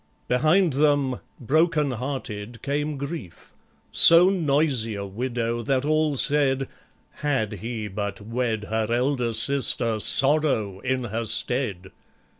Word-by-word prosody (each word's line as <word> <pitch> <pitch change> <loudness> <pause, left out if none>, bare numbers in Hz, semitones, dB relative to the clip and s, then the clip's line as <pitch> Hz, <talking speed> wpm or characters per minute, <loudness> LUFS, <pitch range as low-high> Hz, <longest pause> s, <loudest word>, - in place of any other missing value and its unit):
Behind 155 +6 +2
them, 140 -2 +1 0.2
broken 150 +2 +1
hearted, 120 -3 -6
Came 145 +1 -2
GRIEF, 140 - -8 0.4
so 170 +3 +7
noisy 140 - +1
a 100 0 -5
widow, 120 +2 -3
that 130 +3 -1
all 155 -1 +1
said, 135 -1 +2 0.5
"Had 135 -8 -1
he 115 -2 -5
but 100 -1 -5
wed 115 0 -3
Her 110 0 -2
elder 125 0 0
sister 120 -4 0
SORROW, 135 -7 +1
in 130 +3 -2
her 115 0 -4
stead!" 110 -4 0
130 Hz, 115 wpm, -24 LUFS, 110-145 Hz, 0.5 s, so